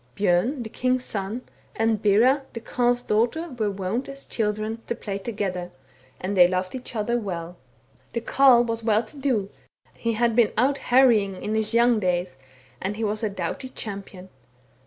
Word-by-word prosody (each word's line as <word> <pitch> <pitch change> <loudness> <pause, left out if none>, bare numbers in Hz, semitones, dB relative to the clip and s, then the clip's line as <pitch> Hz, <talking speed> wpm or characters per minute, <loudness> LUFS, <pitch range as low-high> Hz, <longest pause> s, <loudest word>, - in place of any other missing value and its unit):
Bjorn 205 +8 +1
the 220 - -7
king's 255 0 0
son, 210 +4 -4 0.3
and 225 -1 +1
Bera 230 +7 +4
the 230 - -5
Carle's 245 +1 0
daughter, 245 +12 0
were 230 -6 -1
wont, 200 +7 -3
as 275 0 -9
children, 215 +1 -2
to 235 - -1
play 200 -3 -5
together, 190 -5 -3 0.5
and 190 +2 -3
they 180 -2 +7
loved 185 0 -2
each 255 -2 -7
other 235 +3 0
well. 175 -5 -5 0.6
The 235 - -1
Carle 250 0 +5
was 230 -1 -3
well 220 0 +3
to 220 - -14
do, 245 -8 0 0.4
he 230 -1 -2
had 230 0 +1
been 235 -3 +4
out 275 +4 +2
harrying 225 -7 +4
in 215 - -2
his 220 +1 0
young 235 -1 +4
days, 180 -4 -1 0.5
and 200 +2 -3
he 225 - -3
was 215 0 -1
a 215 - +1
doughty 195 +6 -4
champion. 195 -5 -7
220 Hz, 175 wpm, -25 LUFS, 200-240 Hz, 0.6 s, they